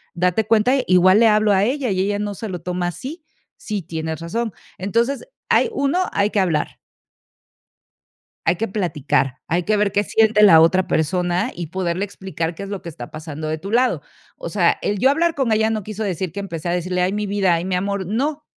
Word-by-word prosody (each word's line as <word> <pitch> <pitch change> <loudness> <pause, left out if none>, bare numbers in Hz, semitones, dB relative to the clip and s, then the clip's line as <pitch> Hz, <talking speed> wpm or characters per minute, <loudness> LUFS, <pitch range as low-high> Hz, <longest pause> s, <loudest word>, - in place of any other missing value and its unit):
Date 180 +5 +1
cuenta, 225 +3 +3
igual 185 +2 +5
le 230 - +6
hablo 215 -1 +3
a 195 -1 +3
ella 255 +1 0
y 185 - -1
ella 205 +1 0
no 205 0 -3
se 215 +2 -6
lo 180 -3 -5
toma 180 0 -2
así". 280 - -7 0.3
"Sí, 210 -4 -4
tienes 160 -1 -4
razón". 220 +8 -3 0.3
Entonces, 235 - 0 0.2
hay - - +4
uno, 315 -3 0
hay 200 +1 +1
que 205 - +1
hablar. 165 -6 0 1.7
Hay 165 +2 +3
que 225 - -1
platicar, 150 -9 -1
hay 175 +3 0
que 215 +4 +1
ver 205 -1 +1
qué 205 +1 +1
siente 215 0 +3
la 165 -6 +8
otra 185 +3 +4
persona, 175 - 0
y 170 -2 -6
poderle 185 +2 -2
explicar 180 -4 -4
qué 165 - -10
es 200 - -6
lo 200 -2 -5
que 170 - -6
está 120 -7 -9
pasando 155 0 -7
de 155 +1 -2
tu 195 +6 -7
lado. 250 +3 +2 0.3
O - - -6
sea, - - +2
el 205 -1 -1
yo 265 - +4
hablar 330 +4 +2
con 270 -6 0
ella 220 0 +2
no 215 -1 -1
quiso 215 +2 -5
decir 185 -3 -2
que 200 - -5
empecé 175 -3 -5
a - - +1
decirle: 180 +1 -1
"Ay, 180 +1 +1
mi 210 +1 -2
vida. 195 -3 +2
Ay, 165 +1 -3
mi 190 - -2
amor", 200 +1 -2
no. 280 - -2
195 Hz, 215 wpm, -21 LUFS, 175-220 Hz, 1.7 s, la